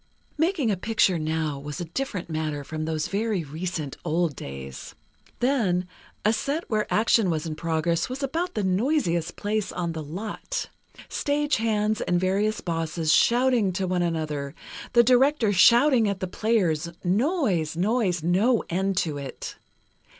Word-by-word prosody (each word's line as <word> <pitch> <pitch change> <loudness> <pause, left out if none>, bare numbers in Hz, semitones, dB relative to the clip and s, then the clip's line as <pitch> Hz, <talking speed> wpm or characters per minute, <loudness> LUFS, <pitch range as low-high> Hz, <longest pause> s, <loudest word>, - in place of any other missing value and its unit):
Making 320 - +1
a 195 - 0
picture 190 -3 +2
now 155 -2 -1
was 145 0 -6
a 175 - -3
different 185 +1 -4
matter 155 -3 -3
from 155 +2 -4
those 155 -1 -1
very 205 -3 -1
recent 155 -1 -4
old 165 -2 0
days. 70 -1 -8 0.5
Then, 210 -9 +1 0.4
a 215 - +4
set 285 +8 -2
where 215 -1 0
action 220 -2 +3
was 160 -2 -1
in 160 - -3
progress, 165 +4 -1
was 265 +3 -5
about 335 +7 -2
the 210 - 0
noisiest 185 - +1
place 210 0 -2
on 170 -2 -2
the 160 -1 -5
lot. 200 - -5 0.4
Stagehands 225 -8 0
and 175 0 +2
various 200 +4 0
bosses 165 -2 0
shouting 240 -4 +3
to 190 +1 -1
one 180 -1 0
another, 155 -4 -2 0.4
the 235 - +7
director 250 -2 +4
shouting 235 +4 +5
at 200 -1 -3
the - - -2
players—noise, 185 - 0
noise, 190 -3 +1
no 205 +8 +3
end 190 +2 0
to 150 -5 0
it. 135 -2 -7
185 Hz, 145 wpm, -25 LUFS, 160-230 Hz, 0.5 s, the